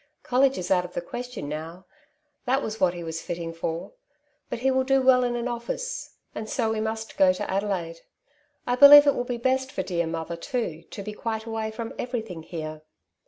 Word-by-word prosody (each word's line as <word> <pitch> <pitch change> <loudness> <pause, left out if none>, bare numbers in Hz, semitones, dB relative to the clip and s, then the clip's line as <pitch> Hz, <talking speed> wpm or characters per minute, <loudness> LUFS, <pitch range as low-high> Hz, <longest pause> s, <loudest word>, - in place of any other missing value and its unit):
College 265 +2 +3
is 180 - -4
out 180 -1 +4
of 180 0 -9
the - - 0
question 245 - -6
now; 160 +5 -6 0.6
that 265 +3 +1
was 220 0 -4
what 180 -2 +3
he 175 - -6
was 165 0 -4
fitting 170 -1 -5
for; 165 - -4 0.6
but - - -3
he 265 +3 +1
will 260 0 +2
do 270 +1 +3
well 260 -1 +5
in 245 -1 0
an 240 0 -2
office, - - -4 0.2
and 215 0 -6
so 225 -3 0
we 220 - -1
must 220 0 -4
go 190 -1 +6
to 185 - -4
Adelaide. 190 -4 -2 0.7
I 245 - +1
believe 285 +3 +10
it 285 - +5
will 245 - -2
be 245 -1 -3
best 260 +2 0
for 190 - -2
dear 170 -2 -1
mother, 165 +1 -4
too, 175 - -3
to 200 - -7
be 210 +1 -6
quite 220 0 -4
away 225 -1 -3
from 225 +1 -6
everything 225 -9 -4
here.'' 155 -2 -6
220 Hz, 210 wpm, -26 LUFS, 175-250 Hz, 0.7 s, believe